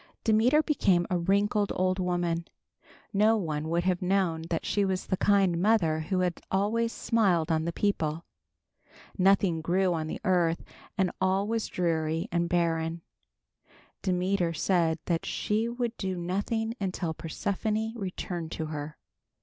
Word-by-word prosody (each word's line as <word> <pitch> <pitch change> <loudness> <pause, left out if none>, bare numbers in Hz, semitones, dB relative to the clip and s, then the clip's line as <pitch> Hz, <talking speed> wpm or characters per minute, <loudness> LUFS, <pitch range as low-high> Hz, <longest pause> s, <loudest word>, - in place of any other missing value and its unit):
Demeter 235 +8 +4
became 190 - +2
a 180 - +2
wrinkled 200 +3 +1
old 185 +1 +1
woman. 175 -2 -1 0.7
No 215 +3 +4
one 155 -5 -3
would 170 +1 +1
have 185 -1 0
known 180 -4 +1
that 165 - -2
she 205 - +1
was 190 -1 -1
the - - 0
kind 195 -4 +3
mother 185 -7 +3
who 185 +4 -1
had 180 -2 -1
always 220 +4 +1
smiled 180 -11 +1
on 160 0 +1
the 170 - -1
people. 165 -4 -1 0.9
Nothing 190 -3 +3
grew 180 +2 +1
on 160 -2 -2
the - - -5
earth 175 -3 +2 0.3
and 190 -2 +2
all 190 +2 +2
was 225 0 -1
dreary 165 -2 -1
and 170 0 0
barren. 165 -1 0 1.0
Demeter 180 -2 0
said 165 -4 +2
that 170 -2 0
she 220 +2 -1
would 240 -1 -3
do 190 -2 -2
nothing 205 +6 -2
until 180 -4 -2
Persephone 215 +7 -2
returned 180 -5 -5
to 160 - -3
her. 150 +1 -6
185 Hz, 145 wpm, -28 LUFS, 165-200 Hz, 1.0 s, Demeter